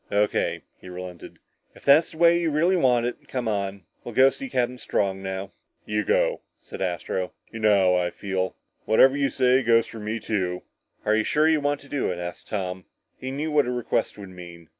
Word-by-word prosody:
"O.K.," 105 Hz, +1 st, 0 dB, 0.2 s
he 90 Hz, -, -11 dB
relented, 90 Hz, -1 st, -9 dB, 0.4 s
"if -, -, -17 dB
that's 145 Hz, +4 st, +6 dB
the -, -, -12 dB
way 170 Hz, +1 st, +5 dB
you 165 Hz, -, +1 dB
really 165 Hz, +5 st, +2 dB
want 125 Hz, -8 st, +3 dB
it. 120 Hz, -, -5 dB
Come 125 Hz, -3 st, -3 dB
on. 100 Hz, -2 st, -2 dB, 0.2 s
We'll 120 Hz, -, -8 dB
go 135 Hz, +1 st, +6 dB
see 270 Hz, -1 st, -7 dB
Captain 125 Hz, -, -1 dB
Strong 95 Hz, -4 st, -1 dB
now." 95 Hz, +1 st, -5 dB, 0.3 s
"You 105 Hz, 0 st, -1 dB
go," -, -, +1 dB, 0.2 s
said -, -, -10 dB
Astro. 90 Hz, 0 st, -2 dB, 0.2 s
"You 115 Hz, -, -7 dB
know 100 Hz, -4 st, +4 dB
how 90 Hz, -1 st, +1 dB
I -, -, -1 dB
feel. 95 Hz, -2 st, -3 dB, 0.3 s
Whatever 130 Hz, +5 st, +5 dB
you 140 Hz, -1 st, +1 dB
say 130 Hz, 0 st, +3 dB
goes 115 Hz, -1 st, +4 dB
for 115 Hz, -, -10 dB
me 110 Hz, +2 st, -3 dB
too." 90 Hz, -6 st, -2 dB, 0.4 s
"Are 110 Hz, -, +3 dB
you 110 Hz, -, +2 dB
sure 150 Hz, +6 st, +2 dB
you 160 Hz, -2 st, +3 dB
want 145 Hz, 0 st, 0 dB
to 140 Hz, -, -15 dB
do 140 Hz, -8 st, -1 dB
it?" 90 Hz, -, -4 dB
asked 90 Hz, 0 st, -7 dB
Tom. 95 Hz, -3 st, -4 dB, 0.3 s
He 130 Hz, -, -5 dB
knew 145 Hz, +4 st, -3 dB
what 150 Hz, -1 st, +3 dB
such -, -, -3 dB
a -, -, -1 dB
request 120 Hz, -3 st, -1 dB
would 100 Hz, -2 st, -9 dB
mean. 85 Hz, -2 st, -12 dB
110 Hz, 215 wpm, -25 LUFS, 95-135 Hz, 0.4 s, that's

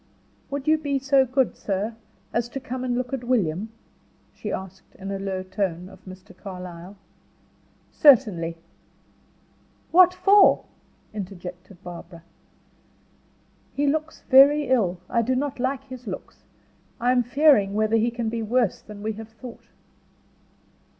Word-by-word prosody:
"Would 280 Hz, 0 st, -5 dB
you 310 Hz, 0 st, +4 dB
be 285 Hz, -2 st, -1 dB
so 270 Hz, 0 st, +3 dB
good 260 Hz, 0 st, +1 dB
sir, 205 Hz, +3 st, -3 dB, 0.4 s
as 235 Hz, 0 st, -1 dB
to 270 Hz, -, -5 dB
come 255 Hz, 0 st, -5 dB
and 245 Hz, -1 st, -1 dB
look 255 Hz, +1 st, -3 dB
at 260 Hz, -2 st, -3 dB
William?" 215 Hz, -5 st, 0 dB, 0.6 s
she -, -, -6 dB
asked 190 Hz, 0 st, -8 dB
in 195 Hz, +1 st, -7 dB
a 195 Hz, -, -3 dB
low 190 Hz, -1 st, -3 dB
tone, 185 Hz, -2 st, -3 dB
of -, -, -16 dB
Mr. 185 Hz, +1 st, -12 dB
Carlyle. 180 Hz, 0 st, -9 dB, 0.9 s
"Certainly." 205 Hz, -, +4 dB, 1.3 s
"What 360 Hz, +1 st, +7 dB
for?" 390 Hz, +2 st, +5 dB, 0.5 s
interjected 185 Hz, -2 st, -8 dB
Barbara. 170 Hz, -1 st, -10 dB, 1.5 s
"He 285 Hz, -, 0 dB
looks 310 Hz, +2 st, -1 dB
very 280 Hz, +1 st, +6 dB
ill. 200 Hz, -9 st, +2 dB
I 235 Hz, -, +1 dB
do 255 Hz, +3 st, 0 dB
not 275 Hz, 0 st, -2 dB
like 265 Hz, +2 st, -1 dB
his 255 Hz, -3 st, -11 dB
looks. 185 Hz, -, -8 dB, 0.5 s
I 245 Hz, +2 st, +2 dB
am 250 Hz, -1 st, +3 dB
fearing 245 Hz, -5 st, +3 dB
whether 215 Hz, +1 st, +2 dB
he 225 Hz, +2 st, +2 dB
can 235 Hz, -1 st, -4 dB
be 230 Hz, +1 st, -2 dB
worse 230 Hz, -1 st, 0 dB
than 210 Hz, -1 st, -11 dB
we 220 Hz, -, -1 dB
have 220 Hz, +1 st, -10 dB
thought." 230 Hz, +2 st, -12 dB
230 Hz, 140 wpm, -24 LUFS, 190-265 Hz, 1.5 s, What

